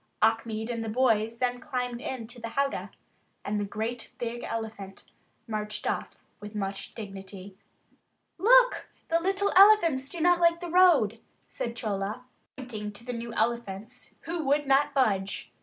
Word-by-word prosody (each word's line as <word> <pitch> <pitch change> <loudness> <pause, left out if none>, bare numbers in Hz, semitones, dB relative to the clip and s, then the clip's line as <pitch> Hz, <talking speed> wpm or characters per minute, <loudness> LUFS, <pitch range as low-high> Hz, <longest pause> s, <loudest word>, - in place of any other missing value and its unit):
Achmed 220 +1 +1
and 230 -1 -3
the 225 - -4
boys 225 -1 +2
then 245 0 0
climbed 250 -3 -3
into 245 -2 -6
the 230 - -4
howdah, 275 +3 -1 0.6
and 210 +1 -1
the - - 0
great 220 +4 -4
big 240 0 -4
elephant 220 -4 -6 0.4
marched 210 -1 -4
off - - -2 0.2
with 210 +1 -9
much 195 -1 -4
dignity. 195 -2 -9 0.8
"Look, - - +5 0.2
the 330 0 +3
little 390 +3 0
elephants 345 -9 +6
do 340 - -6
not 350 +2 +4
like 335 0 +4
the 350 -1 -6
road," 310 - +5 0.3
said 235 0 -5
Chola, 210 +2 -3 0.3
pointing 220 -5 -6
to 230 +3 -12
the 250 - -4
new 235 0 -5
elephants, 230 0 -3
who 335 -1 -3
would 290 +1 +2
not 280 +1 +3
budge. 200 -7 0
235 Hz, 150 wpm, -28 LUFS, 215-280 Hz, 0.8 s, elephants